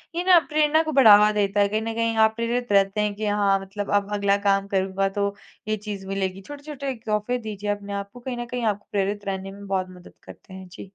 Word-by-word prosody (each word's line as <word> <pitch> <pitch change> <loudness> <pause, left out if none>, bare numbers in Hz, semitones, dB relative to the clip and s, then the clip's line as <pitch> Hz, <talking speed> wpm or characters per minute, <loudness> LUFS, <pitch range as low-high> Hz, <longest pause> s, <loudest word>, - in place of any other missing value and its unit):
ये 350 - -1
ना 365 -2 +7
प्रेरणा 305 +1 +3
को 315 - -3
बढ़ावा 210 -6 +7
देता 205 -1 0
है, 200 - +4
कहीं 215 +2 -1
न 225 0 -3
कहीं 230 0 0
आप 220 0 +4
प्रेरित 235 0 -2
रहते 200 +1 +3
हैं 210 -1 0
कि 215 - -4
हाँ 205 -1 +2
मतलब 200 +1 -6
अब 205 0 0
अगला 200 -1 +2
काम 195 0 +2
करूँगा 195 0 0
तो 200 0 -1 0.3
ये 215 0 0
चीज़ 205 -2 -7
मिलेगी। 195 -1 -3
छोटे-छोटे 285 +2 -7
एक 230 -3 -10
तोहफ़े 215 +3 -1
दीजिए 210 -3 -6
अपने 205 0 -3
आप 200 0 -4
को, 245 - -11
कहीं 245 0 -5
न 240 - -4
कहीं 245 0 -5
आपको 205 -1 -2
प्रेरित 205 +1 -2
रहने 195 0 -4
में 200 0 -11
बहुत 190 -1 -1
मदद 180 -1 -14
करते 190 - -14
हैं। 190 -1 -10
जी। 180 +2 -11
205 Hz, 240 wpm, -24 LUFS, 195-230 Hz, 0.3 s, ना